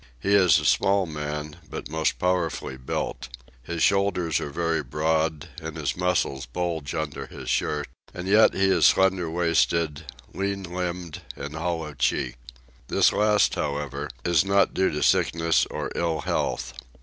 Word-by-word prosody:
He 100 +10 0
is 95 -4 +6
a - - -2
small 100 0 +3
man, 75 -1 -5
but - - -6
most 80 +1 0
powerfully 90 -6 -1
built. 65 0 -4 0.3
His 85 +5 -3
shoulders 100 -5 +2
are - - -4
very 80 +1 0
broad, 80 +2 -1
and 80 0 -6
his 75 -3 -2
muscles 80 -7 0
bulge 80 +1 -3
under 80 -2 -4
his - - -6
shirt; 75 -1 0 0.2
and 90 +1 -6
yet 105 +3 +5
he 95 - +2
is 95 - +5
slender 95 -3 +3
waisted, 85 -2 +1 0.3
lean 100 0 -2
limbed, 90 -2 -4
and 70 +2 -7
hollow 80 -2 -3
cheeked. - - -1 0.5
This - - +3
last, 105 0 +3
however, 70 -1 -3 0.2
is 85 0 +4
not 100 0 +2
due 95 - +2
to 75 - -2
sickness 85 0 +2
or - - -4
ill 80 -3 -1
health. - - -2
80 Hz, 150 wpm, -25 LUFS, 75-90 Hz, 0.5 s, is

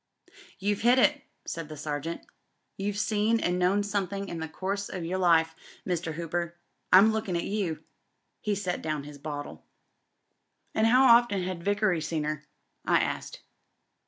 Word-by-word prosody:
"You've 205 +1 -1
hit 240 +3 +5
it," 295 +2 +4 0.2
said 165 -2 -5
the 155 - -8
Sergeant. 150 +3 -4 0.5
"You've 200 +1 -3
seen 215 +2 +2
an' 180 -2 0
known 190 +3 +3
somethin' 200 -1 -2
in 170 - -5
the 160 - -3
course 195 +5 -3
o' - - -5
your 180 +2 -3
life, 165 -3 +4 0.3
Mr. 170 -3 -2
Hooper. 170 +1 -3 0.4
I'm 200 +4 +8
lookin' 215 -5 -2
at 170 - 0
youl" 195 -6 -2 0.6
He 210 -1 -1
set 185 -3 -2
down 155 -2 -2
his 145 0 -10
bottle. 145 0 -6 1.1
And 220 +1 +3
how 250 +3 +6
often 235 -6 +5
had 180 -2 -4
Vickery 205 -4 +1
seen 155 0 -2
her?" 150 0 -3 0.4
I - - +3
asked. - - -3
185 Hz, 160 wpm, -28 LUFS, 165-205 Hz, 1.1 s, I'm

